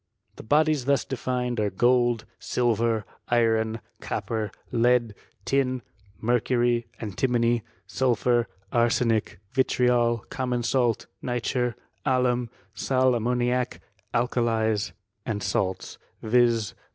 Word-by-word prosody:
The -, -, -8 dB
bodies 150 Hz, +1 st, +2 dB
thus 140 Hz, 0 st, +2 dB
defined 125 Hz, -2 st, -2 dB
ars 105 Hz, -3 st, 0 dB
gold, 120 Hz, -2 st, +3 dB
silver, 115 Hz, -3 st, +1 dB, 0.2 s
iron, 115 Hz, -1 st, +2 dB, 0.2 s
copper, 105 Hz, +1 st, -3 dB, 0.2 s
lead, 120 Hz, -1 st, +3 dB, 0.3 s
tin, 130 Hz, -3 st, +1 dB, 0.4 s
mercury, 120 Hz, 0 st, +1 dB
anti* 110 Hz, +4 st, -1 dB
mony, 120 Hz, -1 st, +2 dB, 0.2 s
sulphur, 120 Hz, -2 st, +1 dB, 0.2 s
arsenic, 115 Hz, -2 st, +1 dB
vitriol, 125 Hz, -3 st, +2 dB
common 125 Hz, -2 st, -1 dB
salt, 120 Hz, -2 st, +1 dB, 0.2 s
nitre^ 125 Hz, 0 st, -1 dB, 0.3 s
alum, 125 Hz, -3 st, +1 dB, 0.2 s
sal 130 Hz, -1 st, +2 dB
ammoniac, 125 Hz, +1 st, 0 dB, 0.3 s
alkalies, 115 Hz, -3 st, +1 dB, 0.3 s
and 105 Hz, -2 st, -3 dB
salts; 95 Hz, -1 st, -2 dB, 0.2 s
viz. 115 Hz, -2 st, +3 dB
120 Hz, 95 wpm, -26 LUFS, 115-125 Hz, 0.4 s, gold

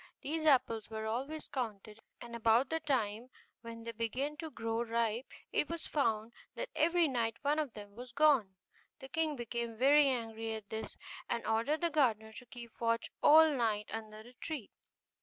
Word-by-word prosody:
These 315 Hz, +2 st, -1 dB
apples 245 Hz, -7 st, +3 dB
were 220 Hz, -1 st, -4 dB
always 270 Hz, +8 st, -3 dB
counted, 215 Hz, -4 st, -5 dB, 0.2 s
and 235 Hz, -1 st, -8 dB
about 230 Hz, +3 st, +3 dB
the 320 Hz, -, +1 dB
time 245 Hz, -6 st, -1 dB, 0.3 s
when 230 Hz, -1 st, -8 dB
they 230 Hz, -, -4 dB
began 240 Hz, +6 st, -2 dB
to 320 Hz, 0 st, -5 dB
grow 225 Hz, -4 st, -2 dB
ripe 230 Hz, +1 st, -1 dB, 0.2 s
it 295 Hz, -, +1 dB
was 335 Hz, -1 st, -4 dB
found 225 Hz, -6 st, 0 dB, 0.2 s
that -, -, -4 dB
every 335 Hz, +2 st, +3 dB
night 230 Hz, -4 st, -1 dB
one 295 Hz, +2 st, +2 dB
of 290 Hz, -7 st, -2 dB
them 205 Hz, -1 st, -10 dB
was 245 Hz, +1 st, -9 dB
gone. 270 Hz, -10 st, +4 dB, 0.4 s
The 265 Hz, -1 st, -10 dB
king 315 Hz, 0 st, 0 dB
became 235 Hz, -2 st, -4 dB
very 285 Hz, +4 st, +6 dB
angry 225 Hz, -3 st, -2 dB
at 215 Hz, -2 st, -9 dB
this, 220 Hz, 0 st, -5 dB, 0.3 s
and 235 Hz, -, -1 dB
ordered 230 Hz, +9 st, +1 dB
the 340 Hz, -1 st, +1 dB
gardener 220 Hz, -7 st, +2 dB
to 250 Hz, -, -9 dB
keep 235 Hz, 0 st, -11 dB
watch 230 Hz, 0 st, 0 dB
all 315 Hz, +1 st, +8 dB
night 220 Hz, -5 st, 0 dB
under 215 Hz, -1 st, -6 dB
the 245 Hz, +2 st, -15 dB
tree. 275 Hz, -3 st, -6 dB
235 Hz, 175 wpm, -34 LUFS, 225-290 Hz, 0.4 s, all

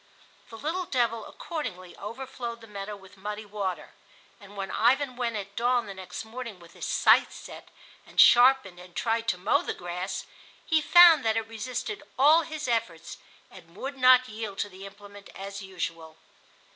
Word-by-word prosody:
The 225 Hz, -, -10 dB
little 335 Hz, +8 st, -3 dB
devil 230 Hz, -3 st, 0 dB
accordingly 185 Hz, -, -6 dB
overflowed 235 Hz, +1 st, -7 dB
the -, -, -11 dB
meadow 205 Hz, -1 st, -7 dB
with 195 Hz, 0 st, -17 dB
muddy 210 Hz, +2 st, -6 dB
water, 200 Hz, -3 st, -4 dB, 0.5 s
and, 205 Hz, 0 st, -14 dB
when 195 Hz, -1 st, -4 dB
Ivan 255 Hz, +3 st, +2 dB
went 240 Hz, -2 st, -2 dB
at 200 Hz, -1 st, -6 dB
dawn 245 Hz, 0 st, +1 dB
next 190 Hz, +3 st, -7 dB
morning 230 Hz, -3 st, -8 dB
with 170 Hz, -1 st, -16 dB
his -, -, -6 dB
scythe -, -, +4 dB
set -, -, -11 dB, 0.4 s
and -, -, -6 dB
sharpened 245 Hz, -7 st, +6 dB
and 180 Hz, -1 st, -14 dB
tried 230 Hz, 0 st, -1 dB
to 180 Hz, -, +1 dB
mow 190 Hz, +5 st, +2 dB
the -, -, -4 dB
grass, 180 Hz, +2 st, -5 dB, 0.4 s
he 320 Hz, -2 st, +2 dB
found 340 Hz, -2 st, +8 dB
that 220 Hz, 0 st, +1 dB
it 225 Hz, -1 st, -2 dB
resisted 245 Hz, -, -5 dB, 0.2 s
all 300 Hz, +5 st, +6 dB
his 310 Hz, -3 st, -6 dB
efforts 200 Hz, -9 st, -2 dB, 0.3 s
and 170 Hz, -2 st, -16 dB
would 275 Hz, +7 st, -5 dB
not 255 Hz, -1 st, +6 dB
yield 215 Hz, -3 st, -6 dB
to -, -, -12 dB
the 195 Hz, +1 st, -10 dB
implement 200 Hz, 0 st, -14 dB
as 195 Hz, +1 st, -7 dB
usual. 165 Hz, -4 st, -6 dB
220 Hz, 170 wpm, -27 LUFS, 195-255 Hz, 0.5 s, found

